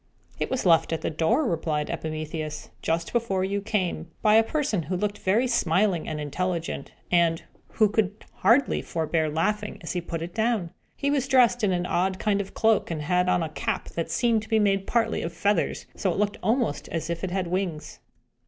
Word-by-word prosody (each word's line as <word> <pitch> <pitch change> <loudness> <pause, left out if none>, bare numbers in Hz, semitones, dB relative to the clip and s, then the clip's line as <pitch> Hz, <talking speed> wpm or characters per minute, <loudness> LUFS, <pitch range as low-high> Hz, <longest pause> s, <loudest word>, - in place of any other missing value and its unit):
"It - - -1
was 260 -4 -2
left 165 -2 +4
at 165 - -1
the - - -2
door," 220 - +2
replied 155 -3 -1
Epimetheus, 155 -1 -5
"just 165 +1 -1
before 220 -6 0
you 200 +1 -1
came, 185 -6 -2
by 215 - +5
a 220 - +8
person 270 - -1
who 175 +4 -3
looked 205 +2 -2
very 210 +7 +2
smiling 195 -6 +1
and 155 -1 -3
intelligent, 165 0 -3 0.2
and 170 -2 +3 0.3
who 215 - +4
could 210 0 -1
hardly 235 +8 +3
forbear 160 -1 -1
laughing 210 +7 -1
as 165 - -4
he 175 - -1
put 165 -1 -4
it 175 +1 -7
down. 220 -6 0 0.2
He 280 0 0
was 275 -2 +1
dressed 245 -3 +4
in 200 - +3
an 175 -1 0
odd 185 +2 0
kind 205 -1 +1
of 195 - -7
a - - -21
cloak, 220 -2 +2
and 155 -3 -3
had 180 +3 +2
on 175 - +2
a 160 - -3
cap - - -3
that 165 -1 -3
seemed 225 +6 +2
to 215 - -12
be 220 - +3
made 195 -2 +2
partly 235 -1 +1
of 165 - -4
feathers, 205 0 0
so 195 - 0
that 175 - 0
it - - -4
looked 205 0 0
almost 220 - 0
as 165 0 -3
if 170 +1 -4
it 190 - -1
had 185 0 -1
wings." 175 -3 -3
185 Hz, 210 wpm, -26 LUFS, 165-215 Hz, 0.3 s, a